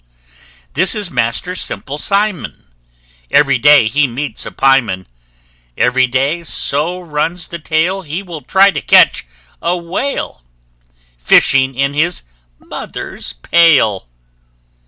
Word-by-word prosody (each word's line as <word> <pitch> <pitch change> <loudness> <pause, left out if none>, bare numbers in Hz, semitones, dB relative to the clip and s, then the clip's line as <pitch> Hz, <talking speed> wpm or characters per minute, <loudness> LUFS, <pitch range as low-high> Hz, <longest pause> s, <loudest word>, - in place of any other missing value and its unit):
This 185 - +1
is 205 -4 -2
Master 120 +8 -1
Simple 145 -5 -4
Simon: 200 - -2 0.6
Every 140 -3 +3
day 145 -3 +5
he 145 +4 +1
meets 135 +4 -4
a - - -7
pie 135 0 +3
man; 95 -6 -6 0.7
Every 125 +1 +2
day, 135 +7 -1
so 160 +3 0
runs 165 +1 -3
the 170 - -7
tale, 165 +5 -1
He 165 +3 -6
will 170 -5 -8
try 195 +5 +3
to - - -4
catch - - +4 0.3
a 175 +2 0
whale, 175 - -4 0.8
Fishing 130 - +3
in 140 +2 -1
his 165 +4 -1 0.3
mother's - - -7
pail! 115 - +2
150 Hz, 120 wpm, -15 LUFS, 130-175 Hz, 0.8 s, day